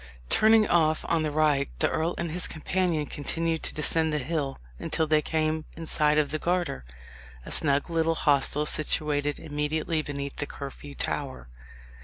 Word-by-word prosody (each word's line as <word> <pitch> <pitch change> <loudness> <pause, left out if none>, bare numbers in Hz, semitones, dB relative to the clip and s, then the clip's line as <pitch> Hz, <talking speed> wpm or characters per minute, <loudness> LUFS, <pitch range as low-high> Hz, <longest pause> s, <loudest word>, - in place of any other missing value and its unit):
Turning 220 -1 +5
off 160 -2 +2
on 165 -1 +2
the 155 - 0
right, 145 -2 +2
the - - +2
earl 165 +2 -1
and 170 -2 -3
his 180 +2 0
companion 165 -1 -1
continued 160 +3 -2
to - - -2
descend 160 +1 +1
the 150 - 0
hill 145 -1 -2 0.2
until 160 - 0
they 155 0 +3
came 155 0 -1
in 165 - -6
sight 150 -1 +2
of 150 -2 +2
the 155 - -2
Garter 175 - -1 0.6
a - - -8
snug 140 -2 +2
little 165 -1 +1
hostel, 145 0 +2
situated 150 -1 0
immediately 155 +2 -2
beneath 140 -2 -5
the 145 - -2
Curfew 140 0 -8
Tower. 130 - -4
155 Hz, 165 wpm, -27 LUFS, 145-165 Hz, 0.6 s, Turning